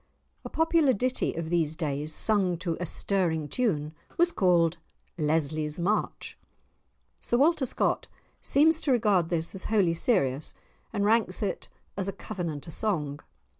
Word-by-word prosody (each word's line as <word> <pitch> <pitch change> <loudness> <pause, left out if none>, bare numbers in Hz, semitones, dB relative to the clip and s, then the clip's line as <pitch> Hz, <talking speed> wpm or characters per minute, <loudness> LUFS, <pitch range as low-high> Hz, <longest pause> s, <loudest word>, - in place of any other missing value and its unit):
A - - -7
popular 320 -4 +3
ditty 250 +4 -1
of 165 0 -4
these 160 -3 +1
days, 150 -1 -2
sung 190 0 +3
to 170 -1 -2
a 175 - -2
stirring 165 -6 +1
tune, 155 - -1 0.2
was 345 +1 +3
called 175 - +2 0.4
"Lesly's 155 0 -1
March." 195 +5 -2 0.8
Sir 240 - 0
Walter 290 0 +3
Scott - - -1 0.3
seems 320 +3 +3
to 280 - 0
regard 205 -8 +2
this 165 -1 -1
as 190 - -6
wholly 200 -6 +2
serious, 155 - 0 0.4
and 200 - -1
ranks 215 -3 +2
it 200 - -3 0.3
as 195 -1 -2
a 195 - -2
Covenanter 170 -6 -5
song. 150 -9 -2
180 Hz, 140 wpm, -27 LUFS, 160-220 Hz, 0.8 s, popular